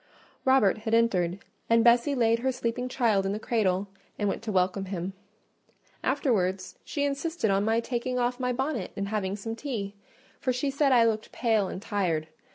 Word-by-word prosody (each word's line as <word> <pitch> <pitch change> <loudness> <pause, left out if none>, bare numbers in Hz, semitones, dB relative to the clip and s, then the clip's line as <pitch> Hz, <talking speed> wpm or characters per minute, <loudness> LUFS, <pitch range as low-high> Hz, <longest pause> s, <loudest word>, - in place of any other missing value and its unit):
Robert 260 -7 +4
here 220 +1 0
entered, 185 -6 +2 0.3
and 230 0 +5
Bessie 240 +4 +4
laid 230 -2 +3
her 260 +2 +1
sleeping 250 0 -2
child 225 -6 +2
in 195 +1 -1
the 210 - -3
cradle 200 -4 0 0.3
and 205 - 0
went - - -2
to 225 -1 -4
welcome 190 +1 +1
him: 185 0 -4 0.9
afterwards 190 - 0
she 285 - -2
insisted 285 - -1
on 195 +1 +2
my 225 +2 +2
taking 250 +1 -2
off 245 +1 0
my 250 -1 0
bonnet 255 -5 -2
and 200 0 -2
having 200 -2 -1
some 225 +2 -5
tea; 225 -7 -4 0.5
for 255 - 0
she 255 +3 -1
said 280 0 +2
I 240 -2 +6
looked 220 -1 -1
pale 220 -5 +1
and - - -5
tired. 180 -7 -1
225 Hz, 180 wpm, -28 LUFS, 195-250 Hz, 0.9 s, I